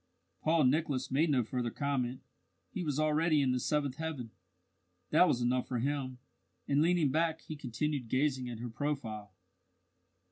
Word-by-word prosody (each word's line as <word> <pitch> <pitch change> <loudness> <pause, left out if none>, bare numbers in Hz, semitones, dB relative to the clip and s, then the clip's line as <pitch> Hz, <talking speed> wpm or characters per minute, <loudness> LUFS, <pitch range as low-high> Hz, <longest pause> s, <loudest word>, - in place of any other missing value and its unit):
Paul 160 0 +3
Nicholas 130 -1 +1
made 155 +5 +3
no 130 -4 +3
further 120 +1 -2
comment. 130 -1 -2 0.5
He 200 - -4
was 150 -4 -1
already 155 +1 +3
in 135 -2 +2
the 125 - +1
seventh 145 0 0
heaven 155 -8 -4 0.8
that 165 +4 +6
was 125 - +1
enough 125 +1 +1
for 125 - -2
him; 130 0 -2 0.5
and 140 +1 +3
leaning 165 -4 +3
back, 160 +2 +1
he 155 - -7
continued 145 -1 -2
gazing 130 -1 +1
at 120 - -5
her 120 - -4
profile. 115 -6 -3
140 Hz, 155 wpm, -32 LUFS, 125-155 Hz, 0.8 s, that